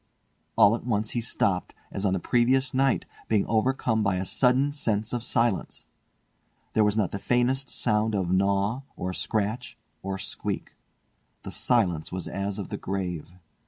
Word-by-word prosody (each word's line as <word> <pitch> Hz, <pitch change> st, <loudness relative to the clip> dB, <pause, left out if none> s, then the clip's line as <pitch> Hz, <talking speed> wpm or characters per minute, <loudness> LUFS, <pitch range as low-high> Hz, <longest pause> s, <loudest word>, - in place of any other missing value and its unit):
All 100 Hz, -, +6 dB
at 115 Hz, -, -3 dB
once 110 Hz, -3 st, -1 dB
he 120 Hz, -, -1 dB
stopped, 100 Hz, -5 st, -1 dB, 0.2 s
as 100 Hz, -, -3 dB
on 95 Hz, -, +2 dB
the 95 Hz, -, 0 dB
previous 130 Hz, +5 st, +2 dB
night, 135 Hz, 0 st, +2 dB, 0.2 s
being 105 Hz, -3 st, +2 dB
overcome 115 Hz, 0 st, +1 dB
by 100 Hz, -3 st, +1 dB
a 90 Hz, +1 st, -2 dB
sudden 130 Hz, +7 st, +3 dB
sense 110 Hz, -7 st, -1 dB
of 120 Hz, -1 st, -1 dB
silence. 115 Hz, -4 st, 0 dB, 0.9 s
There 110 Hz, -, +4 dB
was 105 Hz, 0 st, +2 dB
not 100 Hz, -5 st, +1 dB
the 100 Hz, -, -4 dB
faintest 125 Hz, +4 st, +1 dB
sound 110 Hz, -2 st, +1 dB
of 90 Hz, -3 st, 0 dB
gnaw, 100 Hz, +5 st, +2 dB
or 90 Hz, 0 st, -3 dB
scratch, 110 Hz, +4 st, -2 dB, 0.2 s
or 95 Hz, 0 st, -3 dB
squeak. -, -, -4 dB, 0.7 s
The -, -, -6 dB
silence 90 Hz, -11 st, +1 dB
was 90 Hz, -1 st, -4 dB
as 100 Hz, 0 st, -3 dB
of 100 Hz, -, -5 dB
the -, -, -3 dB
grave. 90 Hz, -4 st, -3 dB
110 Hz, 160 wpm, -27 LUFS, 95-120 Hz, 0.9 s, All